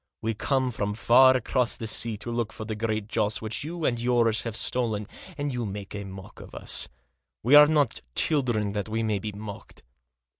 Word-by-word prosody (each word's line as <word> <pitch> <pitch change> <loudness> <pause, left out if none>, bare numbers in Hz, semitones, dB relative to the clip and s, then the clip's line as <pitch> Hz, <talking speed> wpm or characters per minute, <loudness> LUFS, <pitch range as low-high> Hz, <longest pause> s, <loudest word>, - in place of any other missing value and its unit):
We 115 +1 -2
come 130 +4 0
from 105 -2 -3
far 130 +3 +6
across 125 -1 0
the 115 - -6
sea 110 0 +3
to 120 +3 -6
look 115 -2 -2
for 110 - -8
the 110 - -4
Great 110 -1 -2
Joss, 105 -2 0
which 110 +3 -4
you 165 +1 -4
and 120 -1 0
yours 120 -2 +2
have 115 -2 -5
stolen, 110 -3 0 0.3
and 145 -2 -2
you 120 -1 -2
make 100 -1 -6
a 100 -1 -5
mock 95 0 -11
of - - -12
us. - - -2 0.5
We 125 +6 +2
are 150 0 +10
not 145 -6 +1
children 120 -9 +1
that 105 +1 -3
we 115 +1 -1
may 105 -2 0
be 105 +2 -5
mocked. 105 0 -10
115 Hz, 200 wpm, -26 LUFS, 105-125 Hz, 0.5 s, are